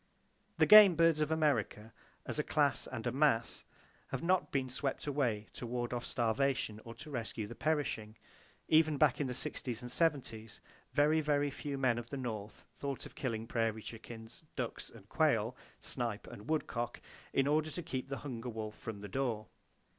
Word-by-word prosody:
The - - +5
game 210 -4 +10
birds 165 -1 +4
of 150 - +1
America, 130 -8 0 0.3
as - - -2
a - - +2
class - - +2
and - - -6
a - - +1
mass, - - +2 0.4
have - - -4
not 175 -4 +2
been 135 -2 0
swept 130 +2 -3
away 125 -8 0
to 120 - -6
ward 120 0 -2
off 120 0 -3
starvation 120 -2 0
or 115 0 -9
to 150 +6 -10
rescue 115 -4 -3
the 105 - -8
perishing. 120 -7 -1 0.5
Even 155 -1 +4
back 145 -2 +4
in 140 - 0
the 125 - -3
sixties 120 -1 -2
and 125 - -5
seventies, 125 -9 0 0.3
very, 150 +3 +4
very 145 -1 +1
few 145 0 -4
men 125 -3 +2
of 120 0 -8
the 140 - -4
North 110 -5 -5
thought 140 -2 -4
of - - -10
killing 115 -5 -3
prairie 115 -2 -1
chickens, 115 0 -9
ducks - - -4
and - - -15
quail, - - +2 0.3
snipe 115 -4 -3
and 105 +6 -10
woodcock, 120 -6 -1 0.3
in 135 - +2
order 155 +2 +2
to 175 +3 -5
keep 130 -5 -4
the 135 0 -4
hunger 125 -3 -4
wolf 110 -2 -5
from 110 -3 -7
the 105 - -6
door. 115 -3 -2
125 Hz, 180 wpm, -34 LUFS, 115-145 Hz, 0.5 s, game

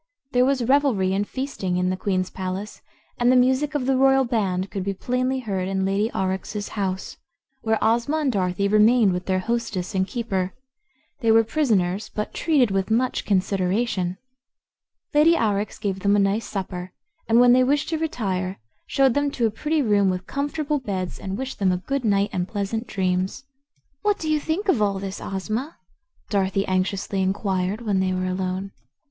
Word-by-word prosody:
There 250 0 +4
was 265 -2 +1
revelry 245 -8 +2
and 205 +1 0
feasting 260 -9 -3
in 180 0 +1
the - - 0
Queen's 185 -1 -1
palace, 190 +2 -5 0.4
and 245 +1 +4
the - - +4
music 260 +4 +2
of 275 -4 0
the 270 0 +2
royal 270 0 +4
band 195 -5 -1
could 195 - -3
be 195 0 -2
plainly 255 +4 -1
heard 195 -5 -2
in 190 0 -1
Lady 200 +3 +1
Aurex's 190 +2 -3
house, 190 -3 -3 0.4
where 220 -1 +1
Ozma 235 +7 +2
and 295 -4 +1
Dorothy 190 -1 0
remained 215 0 +5
with 180 0 -4
their 190 -1 +2
hostess 220 -2 -2
and 190 -1 +1
keeper. 195 -6 -2 0.6
They 230 -4 +2
were 225 0 +6
prisoners, 215 - 0
but 210 - -3
treated 275 -9 +2
with 195 +1 0
much 245 +3 +1
consideration. 190 0 0 1.0
Lady 310 +3 +5
Aurex 210 -5 0
gave 195 -2 -2
them 200 +2 +3
a 200 -1 +4
nice 220 +2 -3
supper 185 -2 -5 0.4
and 230 +1 +5
when 245 0 +7
they 255 0 +5
wished 285 +3 +1
to 320 -1 -1
retire 195 -12 -2 0.3
showed 270 -3 +3
them 285 +1 +1
to 245 -4 -1
a 220 - +1
pretty 300 +7 0
room 205 -4 +3
with 185 0 -2
comfortable 290 +3 -2
beds 190 -7 -4
and 190 0 -4
wished 265 +1 -5
them 190 -2 +3
a 180 - +1
good 275 +8 -3
night 200 -2 +2
and 180 -1 -1
pleasant 215 +3 -3
dreams. 185 +1 -1 0.6
"What 415 -1 +2
do 315 -1 -2
you 305 - +2
think 325 +8 -2
of 275 - +3
all 200 -2 +1
this, 195 0 -5
Ozma?" 215 - -4 0.5
Dorothy 195 -1 +1
anxiously 190 +1 -1
inquired 190 +1 -1
when 205 -4 0
they 185 0 +1
were 185 0 -1
alone. 185 +1 -2
205 Hz, 180 wpm, -23 LUFS, 190-250 Hz, 1.0 s, when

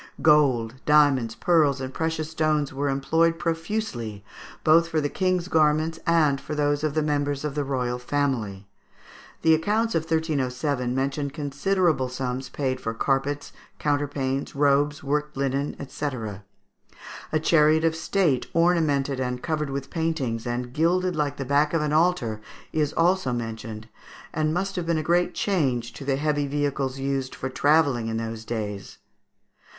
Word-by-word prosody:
Gold, 130 -5 +3
diamonds, 140 -6 +4
pearls, 155 -6 +3
and 130 0 -5
precious 160 0 -2
stones 155 -3 0
were 140 +1 -1
employed 160 +5 +2
profusely, 165 - -3 0.4
both 165 +2 +5
for 160 - +1
the 145 -1 -1
King's 185 -1 0
garments 155 0 +2
and 155 -5 +3
for 155 - -5
those 145 0 +1
of 155 -1 -1
the 155 - +2
members 145 -1 -1
of 150 - -2
the 145 0 -1
royal 125 -3 -2
family. 120 -8 -2 0.8
The 160 - +6
accounts 215 +8 +1
of 165 - +2
1307 140 -5 -1
mention 140 +2 -1
considerable 150 0 0
sums 130 0 -4
paid 130 -3 -2
for 115 0 -3
carpets, 135 +3 -1 0.2
counterpanes, 140 -2 -1
robes, 145 +1 +2
worked 150 +1 -1
linen, 140 +1 -1
&c. 150 - -5 1.3
A 155 - +2
chariot 155 0 +4
of 160 0 +2
state, 160 -5 +1
ornamented 155 -6 +2
and 125 -1 -3
covered 150 -3 -1
with 135 0 -5
paintings, 140 -9 -2
and 120 +1 -3
gilded 180 +4 +1
like 145 -2 -1
the 135 - -4
back 145 +4 +2
of 165 - +2
an 150 0 -1
altar, 155 -10 +1 0.3
is 150 -2 +1
also 175 -5 +2
mentioned, 115 -2 -5 0.5
and 155 0 0
must 190 +4 -2
have 175 -2 -2
been 170 -1 +2
a 155 - -1
great 175 +2 +1
change 130 - 0
to 135 - -9
the 135 0 +1
heavy 145 0 0
vehicles 140 -2 -1
used 135 -1 -2
for 130 - -4
travelling 140 -3 +2
in 110 0 -2
those 115 0 -4
days. 105 -4 -5
145 Hz, 155 wpm, -25 LUFS, 130-160 Hz, 1.3 s, The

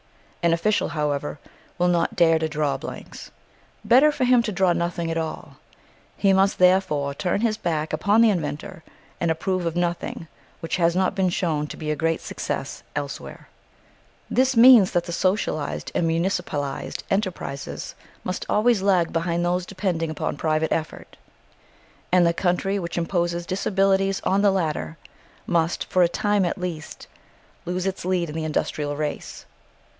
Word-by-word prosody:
An 170 - +3
official, 210 +6 +1
however, 150 -1 -2 0.4
will 180 0 +2
not 170 -1 +1
dare 165 -1 +4
to 160 0 -1
draw 150 -2 0
blanks. - - -8 0.6
Better 270 +6 +6
for 285 - -2
him 250 -1 +5
to 230 - -3
draw 185 -2 +2
nothing 170 -1 -2
at 165 - -2
all. 160 -1 -6 0.6
He 195 -1 +3
must 195 +1 +3
therefore 180 -6 +3
turn 180 +7 -1
his 225 -2 +1
back 160 -4 -2
upon 210 +3 +3
the 230 -2 +6
inventor 155 -2 -4 0.4
and 170 - 0
approve 180 +2 -1
of 165 - -3
nothing 175 -1 -2 0.3
which 165 - -3
has 170 -1 +2
not 185 0 +2
been 190 -2 +1
shown 165 -5 -1
to - - -8
be 155 -1 -3
a - - 0
great 165 +2 0
success - - -4
elsewhere. - - -6 0.8
This 260 -1 +2
means 230 -5 +8
that 175 -1 +2
the 175 - -7
socialised 185 -4 -1
and 165 - +1
municipalised 165 -5 -2
enterprises 185 -8 -3 0.3
must 185 - -4
always 220 -1 +3
lag 185 -4 +2
behind 170 +1 0
those 180 0 0
depending 180 -5 -2
upon 155 - -3
private 155 +1 0
effort; 160 -1 -4 1.0
and 180 -1 +5
the 170 - +3
country 190 +3 0
which 170 -2 -5
imposes 170 0 -1
disabilities 195 +1 +1
on 195 +1 +1
the 205 - +5
latter 165 -4 -2 0.5
must, 170 -1 0
for 185 - +1
a 175 - +5
time 205 +2 +1
at 175 - -1
least, 175 -5 -6 0.6
lose 180 +1 -2
its 195 -1 -3
lead 180 -1 0
in - - -9
the 160 - -2
industrial 150 -1 -2
race. 150 -1 -5
175 Hz, 160 wpm, -24 LUFS, 160-195 Hz, 1.0 s, means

